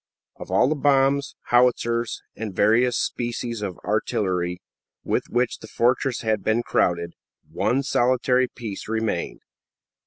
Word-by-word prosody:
Of - - -9
all - - +3
the 150 - +2
bombs, 140 -1 +2
howitzers, 120 -1 +2
and 105 -2 -6
various 115 +5 +3
species 120 -1 -3
of 95 -5 -4
artillery 90 -3 -1 0.4
with - - -1
which 120 0 0
the 110 - -11
fortress 125 +3 +1
had 110 -3 0
been 110 +2 +1
crowded, 85 -5 0 0.4
one 130 +5 0
solitary 125 0 +2
piece 110 -6 -7
remained. 110 -5 -2
120 Hz, 125 wpm, -24 LUFS, 105-125 Hz, 0.4 s, all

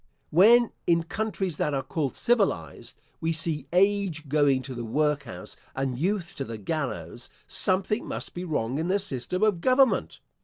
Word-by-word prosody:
When, 230 +8 +6 0.2
in 170 -1 +3
countries 195 -3 -3
that 150 - 0
are 135 - -1
called 140 0 -2
civilised, 200 - 0 0.2
we 165 - 0
see 155 -3 -1
age 185 -4 +2
going 140 -2 +3
to 130 - -6
the 120 -1 -5
workhouse 140 -5 -2 0.2
and 135 -1 -1
youth 185 +5 -1
to 140 - -2
the 115 -3 -6
gallows, 120 - -4 0.2
something 195 +4 -1
must - - -4
be 175 - -5
wrong 140 -6 -1
in 165 - -1
the 190 +2 +2
system 180 - -2
of 205 -6 +2
government. 260 +2 +3
160 Hz, 160 wpm, -27 LUFS, 135-195 Hz, 0.2 s, When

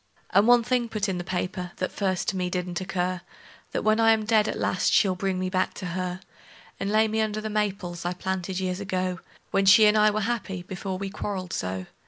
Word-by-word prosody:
And 205 +3 +4
one 240 -1 +6
thing 245 -1 0
put 215 -2 -1
in 185 -2 -2
the - - -3
paper, 180 0 -3
that 185 - -3
first 190 -3 -1
to 195 - -3
me 180 -1 -1
didn't 180 0 -3
occur: 185 -1 -2 0.5
That - - -2
when 215 +1 +3
I 225 0 +6
am 215 -1 -1
dead 215 -1 +3
at - - -2
last 185 - +1
she'll 195 -3 +4
bring 190 0 -2
me 185 0 -1
back 185 0 0
to 190 - -6
her; 180 +1 -3 0.6
And 195 - -2
lay 215 +1 +4
me 220 +1 0
under 215 -1 -1
the 215 0 -4
maples 195 -5 -2
I 175 +1 -1
planted 190 0 -3
years 185 0 -2
ago, 185 -2 -2 0.3
When 195 0 +2
she 215 +2 +8
and 210 0 +5
I 215 0 +5
was 210 0 -1
happy 205 -5 -3
before 190 +1 -5
we 195 0 -5
quarreled 190 -3 -4
so. 95 0 -3
190 Hz, 230 wpm, -26 LUFS, 180-215 Hz, 0.6 s, she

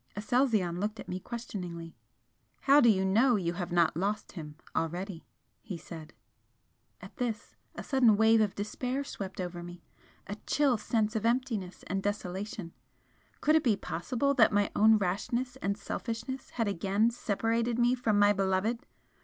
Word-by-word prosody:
Aselzion 215 -5 +1
looked 210 +2 -2
at - - -8
me 180 - -4
questioningly. 180 -8 -6 0.7
"How 285 +2 +6
do 240 - +6
you 190 -3 +3
know 230 +6 +4
you 175 -4 -1
have 175 0 -4
not 170 -3 +3
lost 200 +5 -2
him 150 -4 -8 0.2
already?" 175 +2 -3 0.3
he 190 -5 -6
said. 160 -1 -10 0.9
At - - -12
this 235 -4 -3 0.2
a - - -6
sudden 245 -6 +4
wave 220 +1 +5
of 210 -3 0
despair 250 +6 -3
swept 195 -8 -7
over 175 -1 -4
me 175 0 -10 0.4
a 205 - -6
chill 275 -6 +2
sense 215 0 0
of 220 - -1
emptiness 230 -6 -1
and 195 +1 -2
desolation. 195 -2 -4 0.7
Could 305 +1 +4
it 315 - +4
be 230 -5 +3
possible 250 +13 -1
that 240 -5 +5
my 205 -1 +2
own 220 +1 +6
rashness 235 +7 -1
and 200 -5 -2
selfishness 230 +5 -5
had 230 -3 -1
again 200 +4 +1
separated 230 +1 -1
me 240 +1 +4
from 230 -4 +1
my 205 0 +5
beloved? 195 +4 0
210 Hz, 160 wpm, -30 LUFS, 185-235 Hz, 0.9 s, How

